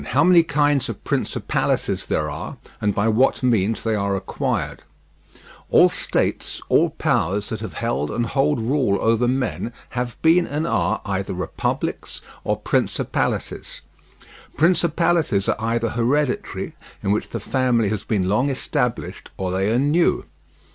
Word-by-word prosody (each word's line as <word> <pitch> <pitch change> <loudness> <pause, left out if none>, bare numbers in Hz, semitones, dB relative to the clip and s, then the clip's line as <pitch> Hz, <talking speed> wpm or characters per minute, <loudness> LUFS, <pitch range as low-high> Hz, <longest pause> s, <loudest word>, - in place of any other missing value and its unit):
HOW - - +2
MANY 180 0 +7
KINDS 145 -3 +1
OF - - -7
PRINCIPALITIES - - -1
THERE 75 - 0
ARE, 75 +1 -6 0.2
AND 105 -1 +1
BY 105 +2 +2
WHAT 125 +4 +2
MEANS 115 -3 +1
THEY 115 - 0
ARE 100 -2 0
ACQUIRED 95 0 -2 0.9
All - - +6
states, - - -1
all - - +4
powers, 100 +5 0
that 110 - -4
have 110 -6 -6
held 70 +1 -1
and 120 - -1
hold 140 +3 +1
rule 120 -3 +1
over 115 +2 +2
men 125 -2 -1 0.2
have 120 -1 -4
been 170 +2 +5
and 150 +3 -2
are - - 0
either 95 -2 -2
republics 90 - -3 0.2
or - - 0
principalities. - - -1 0.8
Principalities 165 - +2
are - - +2
either 115 +1 0
hereditary, 125 +5 -1 0.3
in 100 - +1
which 105 - 0
the 115 - -4
family 120 -1 +1
has 110 -1 -2
been 100 -5 0
long 110 +9 +2
established; 130 -2 -2
or 95 -1 -2
they 95 +3 +1
are 115 - +2
new. 145 +6 +2
115 Hz, 145 wpm, -22 LUFS, 100-145 Hz, 0.9 s, MANY